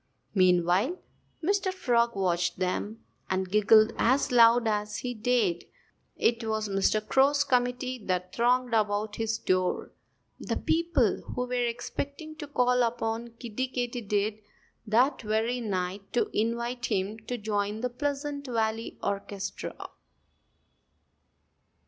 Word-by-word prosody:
Meanwhile 185 - +3 0.5
Mr. 390 +2 +1
Frog 235 - +1
watched 180 -2 0
them 205 +4 -2 0.3
and 190 0 0
giggled 215 +2 +5
as 260 +4 +2
loud 235 -1 +6
as 210 -1 -1
he 245 -1 -3
dared. 220 -6 +1 0.5
It 230 0 +1
was 220 -1 -1
Mr. 205 +2 +1
Crow's 280 +4 +4
committee 250 -2 0
that 180 0 -1
thronged 245 +1 +2
about 210 -1 0
his 225 0 -1
door 185 0 0 0.5
the - - -2
people 320 - +1
who 250 - -1
were 250 - -6
expecting 280 +6 -5
to 300 -2 -7
call 250 -3 +2
upon 230 0 -2
Kiddie 240 +2 -3
Katydid 220 -4 -2 0.5
that 245 +7 +3
very 225 +3 0
night 195 -2 -3
to 240 - +1
invite 235 +3 -1
him 200 +3 -1
to 245 - -2
join 210 0 -2
the 250 - -1
Pleasant 285 +1 -3
Valley 225 -2 -2
orchestra. 200 0 -4
230 Hz, 120 wpm, -28 LUFS, 205-250 Hz, 0.5 s, loud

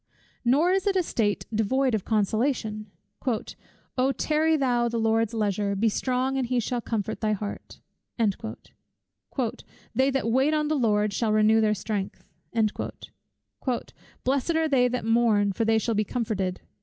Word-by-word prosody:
Nor 285 +9 +4
is 385 +1 +1
it 395 - +2
a 370 - +3
state 210 - 0
devoid 250 +5 +1
of 215 -4 -1
consolation 215 0 0 1.1
"O 260 +2 +3
tarry 310 +3 +2
thou 245 -4 +1
the 235 - -2
Lord's 225 0 +2
leisure, 205 -2 0
be 220 +3 +2
strong 255 +4 0
and 255 - -1
he 250 0 +1
shall 240 +1 -2
comfort 220 -2 -3
thy 215 -1 +1
heart." 205 0 -6 0.4
"They 230 +3 -4
that 270 -4 0
wait 270 +5 +3
on 300 -1 0
the 310 - +2
Lord, 210 -5 +2
shall 220 +1 0
renew 215 +1 +4
their 215 -1 +2
strength." 200 0 -4 2.0
"Blessed 275 +5 +1
are 320 0 +2
they 260 -4 +4
that 245 -2 -2
mourn, 225 -3 +3
for 225 - 0
they 225 0 +3
shall 230 +1 0
be 215 0 +2
comforted." 200 -5 -2
230 Hz, 150 wpm, -26 LUFS, 215-265 Hz, 2.0 s, Nor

